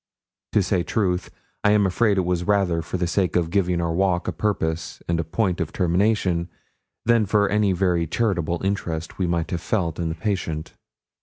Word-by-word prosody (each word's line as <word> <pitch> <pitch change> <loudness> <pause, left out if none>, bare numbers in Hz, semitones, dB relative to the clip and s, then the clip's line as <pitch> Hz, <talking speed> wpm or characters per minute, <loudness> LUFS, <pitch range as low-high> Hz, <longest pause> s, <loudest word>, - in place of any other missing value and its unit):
To 105 - +4
say 95 -1 +1
truth, 90 -1 -1 0.3
I 105 - +5
am 105 -1 +4
afraid 100 +2 +2
it 95 - +1
was 90 -1 0
rather 95 -4 +2
for 90 - -4
the 90 - 0
sake 90 +1 0
of 85 -2 +1
giving 90 -3 +1
our 85 -1 0
walk 90 0 +1
a - - +1
purpose 80 -3 -2
and 85 -1 0
a - - +1
point 90 +2 -1
of 85 - -2
termination, 90 -1 +1 0.6
than 115 -3 +3
for 105 +1 +3
any 105 -1 +2
very 90 -2 +1
charitable 85 -3 -1
interest 85 -5 -3
we 90 - +1
might 85 -1 -1
have 85 -2 -2
felt 90 -8 -1
in 85 -1 -1
the 80 - -3
patient. 80 -4 -3
90 Hz, 190 wpm, -23 LUFS, 85-100 Hz, 0.6 s, I